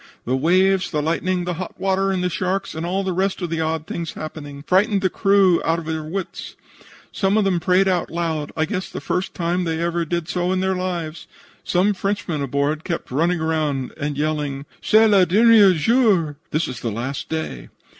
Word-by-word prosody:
The 125 - 0
waves, 185 +6 +3
the 155 - -1
lightning, 175 +4 0
the 180 - -2
hot 185 - -7
water 195 0 +1
and 185 -1 -1
the 180 - +1
sharks, 185 +2 -2
and 160 +2 -4
all 190 +2 -1
the 190 -1 -1
rest 190 +2 0
of 170 - -3
the 165 -1 -1
odd 160 -1 -2
things 170 0 -5
happening, 145 -2 -8
frightened 200 +2 +2
the 185 - +2
crew 195 -3 +3
out 165 0 +1
of 165 - -6
their 160 0 -2
wits. 180 +4 -6 0.6
Some 195 +1 +1
of 215 - +3
them 185 -3 +1
prayed 185 +3 +3
out 180 -2 0
loud 160 -3 -2
I 160 - +2
guess 185 +3 -4
the - - -6
first 180 +1 -3
time 175 +1 0
they 165 -1 -2
ever 170 0 0
did 170 +1 -3
in 180 +1 0
their 190 0 0
lives. 175 -3 -4 0.4
Some 190 +4 +2
Frenchmen 195 -6 -2
aboard 140 +3 -1
kept 170 - -4
running 170 +6 +1
around 155 -5 -1
and 145 -1 -3
yelling, 145 -2 -2 0.2
'Cest 220 0 +5
le 195 -2 +6
dernier 205 +1 +6
jour!' 185 - +2
(This 155 +3 0
is - - -6
the 115 - -3
last 120 +6 -4
day.) 160 - -4
175 Hz, 200 wpm, -21 LUFS, 155-190 Hz, 0.6 s, le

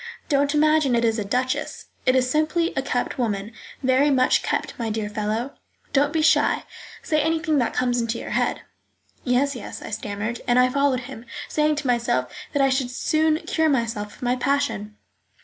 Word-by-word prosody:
Don't 285 +1 +2
imagine 305 -3 +3
it 235 0 +2
is 225 0 +1
a - - -1
duchess. 250 +5 -2 0.2
It 255 - +5
is 255 -1 +3
simply 310 +5 +1
a - - +1
kept 255 -1 -2
woman, 210 -3 -1 0.3
very 260 +3 +4
much 255 -2 +3
kept, - - -2
my 230 -1 -1
dear 215 -1 -2
fellow; 215 +5 -2 0.4
don't 285 +1 +3
be 320 0 +1
shy, 320 - +3 0.4
say 310 -1 +1
anything 315 -1 +1
that 235 - -1
comes 245 -1 +1
into 230 0 -2
your - - -7
head." - - 0 0.6
"Yes, 265 +2 +1
yes," 235 - -7
I - - -8
stammered, 210 +2 -4
and 245 0 +3
I 250 0 +5
followed 280 -1 +1
him, 245 -2 -10 0.2
saying 300 0 +1
to 295 -1 -4
myself 235 - 0 0.2
that 285 - +2
I 270 - +4
should 260 -1 0
soon 310 +5 +1
cure 320 -1 +1
myself 225 -6 -1
of - - -21
my 245 0 +2
passion. 255 -6 -1
255 Hz, 185 wpm, -23 LUFS, 230-285 Hz, 0.6 s, It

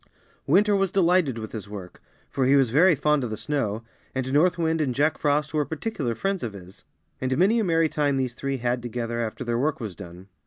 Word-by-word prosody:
Winter 205 0 +4
was 195 -2 +1
delighted 175 -8 +2
with 110 -1 -6
his 105 -3 -7
work, 95 -4 -9 0.3
for 135 - 0
he 135 - +5
was 135 -5 +3
very 165 +6 +5
fond 150 0 +1
of 120 - -3
the 110 - -4
snow, 115 -7 -2 0.3
and 130 0 -2
North 170 +5 +3
Wind 160 -1 0
and 130 -5 -1
Jack 150 +2 +1
Frost 150 0 0
were 150 -1 +2
particular 145 - -3
friends 195 - -2
of 115 -4 -4
his; 95 -1 -12 0.4
and 130 0 0
many 200 +7 +4
a - - +1
merry 165 -3 +2
time 145 -2 0
these 130 -2 -1
three 135 +2 -3
had 120 0 -1
together 120 -1 -4
after 115 +2 -4
their 120 -1 -1
work 155 +4 0
was 105 -7 -6
done. 90 +2 -11
135 Hz, 225 wpm, -25 LUFS, 115-160 Hz, 0.4 s, he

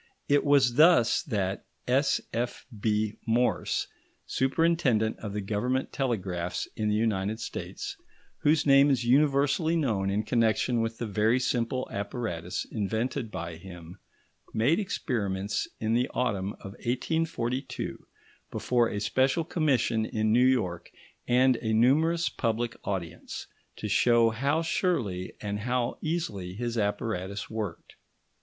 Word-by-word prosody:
It 145 0 +3
was 135 -4 +4
thus 155 -7 +6
that 100 - -2 0.2
S.F.B. 115 -5 -1
Morse, 120 +2 +1 0.4
superintendent 130 -6 +1
of 105 -2 -6
the 105 - -2
Government 110 +6 -1
telegraphs 95 -9 -2
in 105 -1 -1
the 105 - +2
United 105 -1 0
States, - - -6 0.4
whose 150 +1 +3
name 140 0 +6
is 130 -4 +2
universally 140 +4 +3
known 110 -12 0
in 100 +2 0
connection 115 +1 +2
with 115 0 -2
the 120 - -3
very 110 +4 +2
simple 125 0 -1
apparatus 100 -5 -3
invented 110 +2 -2
by 85 -4 -6
him, 85 +1 -11 0.6
made 135 - +3
experiments 105 - -2
in 110 0 0
the 125 +3 +2
autumn 100 -5 -1
of 95 - -10
1842 130 0 -2 0.5
before 120 -2 +1
a 105 - -3
special 130 +9 +1
commission 130 -9 +1
in 110 0 0
New 125 +2 +5
York 105 -10 0 0.4
and 125 0 +4
a 110 -1 -2
numerous 155 +9 +3
public 115 0 -1
audience, 90 -4 -5 0.3
to 105 - -5
show 115 +2 +4
how 140 +8 0
surely 115 - -1
and 105 -1 -3
how 120 +2 -1
easily 105 - -3
his 120 +2 -3
apparatus 100 -2 -2
worked. 105 -6 -5
115 Hz, 125 wpm, -28 LUFS, 105-130 Hz, 0.6 s, thus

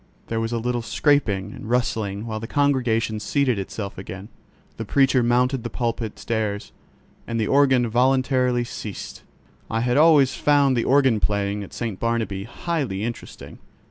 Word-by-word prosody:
There 115 - -1
was 115 0 -2
a 120 - -1
little 120 +1 -1
scraping 110 -7 +1
and 110 - -9
rustling 110 -4 -1
while 110 -1 -4
the 115 - -6
congregation 120 -6 +1
seated 130 -1 0
itself 100 0 -6
again; 95 +2 -8 0.5
the 115 - -4
preacher 135 +3 +3
mounted 125 +2 +2
the 120 - -4
pulpit 115 -3 -3
stairs, 110 -3 -3 0.6
and 115 -1 -2
the 110 - +1
organ 130 -1 +3
voluntary 125 +1 +2
ceased. 110 -3 -7 0.5
I 115 - -1
had 125 +2 +1
always 150 -4 +5
found 145 -2 +3
the 120 - 0
organ 130 -5 +3
playing 100 0 -1
at 100 - -11
St. 115 -5 -4
Barnabķ 110 -4 -2
highly 130 - -3
interesting. 115 +1 -7
115 Hz, 155 wpm, -23 LUFS, 110-130 Hz, 0.6 s, always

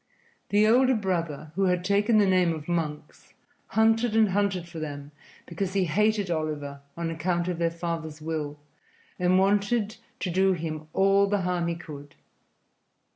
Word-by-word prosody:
The 205 +1 +4
older 255 +4 +4
brother, 170 -7 -2
who 195 +3 +1
had 180 -1 +1
taken 205 +3 +3
the 210 - +5
name 185 -3 +3
of 155 -1 -9
Monks, 160 -4 -4 0.3
hunted 225 +1 +2
and 220 -2 +4
hunted 195 -3 0
for 170 -1 -8
them, 145 -2 -6 0.3
because 180 +2 -4
he 195 -2 +2
hated 205 +3 +1
Oliver 150 -3 -3 0.2
on 170 -1 -2
account 170 +2 -1
of 175 -2 -2
their 170 -1 +2
father's 165 -2 -5
will, 155 -2 -4 0.6
and 180 +1 +3
wanted 205 +3 +1 0.2
to 180 - -1
do 190 +2 +3
him 155 -2 -5
all 195 +1 +4
the 205 0 0
harm 180 -1 0
he 170 - -1
could. 145 -4 -10
180 Hz, 160 wpm, -26 LUFS, 160-200 Hz, 0.6 s, the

